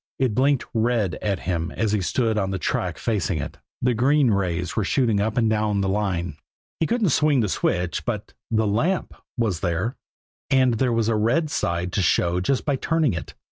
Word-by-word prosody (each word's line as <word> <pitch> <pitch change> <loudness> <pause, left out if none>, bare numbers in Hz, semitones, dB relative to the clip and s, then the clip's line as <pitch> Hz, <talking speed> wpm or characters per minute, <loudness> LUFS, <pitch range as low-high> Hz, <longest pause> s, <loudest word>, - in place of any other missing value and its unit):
It 130 -4 +1
blinked 135 +3 +2
red 115 -5 +1
at 100 -3 -1
him 85 -2 -2
as 110 +2 -1
he 105 -2 +1
stood 115 +4 0
on 100 -2 0
the 95 - -2
track 85 - -2
facing 100 -6 -1
it; 70 - -6 0.2
the 125 0 +3
green 135 +2 +3
rays 90 -3 -1
were 110 - +1
shooting 115 -1 +1
up 110 +3 -1
and 115 -2 +3
down 105 -2 +1
the 95 - 0
line. 90 -6 -1 0.4
He 160 - +1
couldn't 230 -5 +1
swing 150 -2 +3
the 105 - +1
switch 90 -2 -1
but 110 -4 -4 0.2
the 110 -1 +1
lamp 155 - 0 0.2
was 110 -8 0
there 95 +7 -1 0.5
and 130 -2 +4
there 130 -2 +2
was 115 -1 +1
the 115 0 +1
red 125 +9 +1
side 85 -3 -1
to 100 - +1
show 90 0 +2
just 125 +9 0
by 140 -3 +1
turning 160 - +1
it. 85 - -6
110 Hz, 200 wpm, -23 LUFS, 95-125 Hz, 0.5 s, and